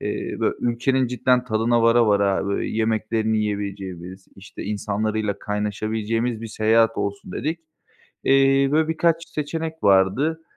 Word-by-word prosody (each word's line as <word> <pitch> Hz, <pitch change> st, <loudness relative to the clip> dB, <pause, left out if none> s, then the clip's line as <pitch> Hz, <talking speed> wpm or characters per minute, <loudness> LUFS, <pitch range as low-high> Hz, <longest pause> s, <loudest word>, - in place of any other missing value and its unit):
eee, -, -, -4 dB
bö -, -, +2 dB
ülkenin 125 Hz, +2 st, +1 dB
cidden 125 Hz, 0 st, +1 dB
tadına 115 Hz, 0 st, +1 dB
vara 115 Hz, 0 st, +4 dB
vara, 100 Hz, -1 st, +2 dB
böyle, 100 Hz, -, -2 dB
yemeklerini 110 Hz, 0 st, 0 dB
yiyebileceğimiz, 95 Hz, -3 st, -5 dB
işte, 95 Hz, +1 st, -10 dB
insanlarıyla 105 Hz, 0 st, -2 dB
kaynaşabileceğimiz 110 Hz, +3 st, -2 dB
bir 115 Hz, -, -5 dB
seyahat 110 Hz, +1 st, +2 dB
olsun 100 Hz, -2 st, -4 dB
dedik. 160 Hz, -, -3 dB, 0.7 s
Eee, 135 Hz, 0 st, +4 dB
böyle 155 Hz, +1 st, +2 dB
birkaç 165 Hz, +1 st, 0 dB
seçenek 160 Hz, +2 st, -4 dB
vardı. 100 Hz, +12 st, +3 dB
110 Hz, 125 wpm, -22 LUFS, 105-130 Hz, 0.7 s, vara